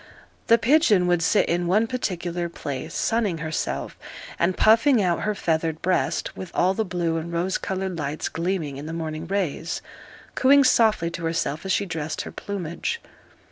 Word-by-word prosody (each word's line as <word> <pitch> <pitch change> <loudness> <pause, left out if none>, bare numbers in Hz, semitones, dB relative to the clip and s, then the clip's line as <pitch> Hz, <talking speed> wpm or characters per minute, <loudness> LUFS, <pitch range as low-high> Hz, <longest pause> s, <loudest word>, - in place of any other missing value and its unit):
The 230 - +6
pigeon 235 - +4
would 175 -1 +2
sit 165 - +3
in 175 +1 0
one 210 +6 +3
particular 180 -8 -3
place, 145 -1 -6
sunning 220 -6 0
herself, 160 0 -3 0.4
and 175 +2 +1
puffing 230 +4 +5
out 180 -4 +1
her 215 -1 -1
feathered 160 -3 -1
breast, 185 0 0
with 185 - -7
all 185 +1 +3
the 220 - 0
blue 175 -4 -1
and 165 +1 -5
rose 175 +3 -1
coloured 190 -2 -3
lights 150 +1 -3
gleaming 165 -5 -2
in 145 +2 -7
the 165 - -5
morning 160 0 -4
rays, 180 -4 -2 0.5
cooing 280 +2 +5
softly 215 -9 +3
to 170 0 -5
herself 165 0 -2
as - - 0
she 200 - +1
dressed 160 -4 -3
her - - -8
plumage. 195 - -4
175 Hz, 170 wpm, -24 LUFS, 165-200 Hz, 0.5 s, The